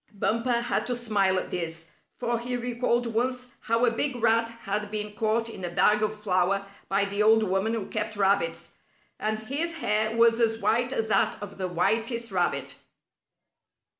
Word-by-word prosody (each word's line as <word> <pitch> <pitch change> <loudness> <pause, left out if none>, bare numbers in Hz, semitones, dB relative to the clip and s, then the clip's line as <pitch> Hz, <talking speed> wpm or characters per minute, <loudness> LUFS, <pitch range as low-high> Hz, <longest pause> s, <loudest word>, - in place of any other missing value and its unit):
Bumper 230 +4 0
had 240 - -1
to 250 - -1
smile 205 -5 +1
at - - -3
this, 165 -2 -4 0.3
for 235 -1 -1
he 245 +1 -3
recalled 240 0 0
once 250 +2 -2
how 230 +2 +1
a 240 - +3
big 260 +3 -1
rat 230 -1 +2
had 210 +1 -2
been 210 0 -4
caught 225 +2 0
in 225 -5 -8
a 175 - -2
bag 210 +4 +3
of 215 0 -1
flour 195 -1 +1 0.2
by 195 +1 +2
the 200 +1 -2
old 220 +1 +5
woman 200 +3 0
who 215 -4 -3
kept 215 0 -3
rabbits, 195 -4 +1 0.5
and 215 0 -1
his 300 +9 -1
hair 215 -5 0
was 230 0 +5
as 225 -1 +2
white 240 +2 +1
as 225 -5 -1
that 210 -3 +2
of 200 -1 -9
the 185 - -1
whitest 225 +6 0
rabbit. 140 -7 -1
220 Hz, 175 wpm, -27 LUFS, 200-235 Hz, 0.5 s, old